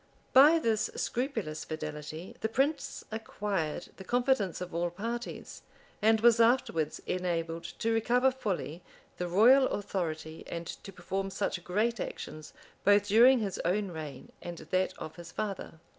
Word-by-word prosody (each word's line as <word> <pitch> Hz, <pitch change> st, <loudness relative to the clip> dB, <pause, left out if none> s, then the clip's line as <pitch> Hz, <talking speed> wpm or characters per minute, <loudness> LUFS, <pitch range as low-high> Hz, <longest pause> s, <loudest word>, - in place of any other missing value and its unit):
By 290 Hz, +5 st, +8 dB
this 225 Hz, -8 st, +1 dB
scrupulous 225 Hz, -, -2 dB
fidelity 155 Hz, +2 st, -6 dB
the 220 Hz, -, -1 dB
prince 275 Hz, +4 st, 0 dB
acquired 200 Hz, -7 st, -3 dB
the 190 Hz, -, -9 dB
confidence 245 Hz, -4 st, +1 dB
of 180 Hz, -1 st, -6 dB
all 170 Hz, +1 st, 0 dB
parties, 230 Hz, +7 st, -5 dB, 0.4 s
and 220 Hz, +1 st, +4 dB
was 235 Hz, 0 st, +6 dB
afterwards 230 Hz, -, +2 dB
enabled 170 Hz, -2 st, -2 dB
to 225 Hz, 0 st, 0 dB
recover 245 Hz, +4 st, +3 dB
fully 190 Hz, -, -3 dB, 0.4 s
the 180 Hz, -, -2 dB
royal 240 Hz, +9 st, +6 dB
authority, 160 Hz, -5 st, -3 dB
and 170 Hz, 0 st, -5 dB
to 195 Hz, -, -8 dB
perform 195 Hz, +1 st, -3 dB
such 190 Hz, -2 st, -2 dB
great 215 Hz, +6 st, 0 dB
actions 155 Hz, -3 st, -6 dB, 0.3 s
both 205 Hz, 0 st, +5 dB
during 240 Hz, +4 st, +7 dB
his 195 Hz, -3 st, -3 dB
own 195 Hz, +3 st, 0 dB
reign 155 Hz, -3 st, -8 dB
and 175 Hz, -1 st, -6 dB
that 185 Hz, +3 st, -1 dB
of 155 Hz, +1 st, -8 dB
his 170 Hz, -1 st, -9 dB
father. 195 Hz, -5 st, -4 dB
195 Hz, 145 wpm, -30 LUFS, 170-230 Hz, 0.4 s, By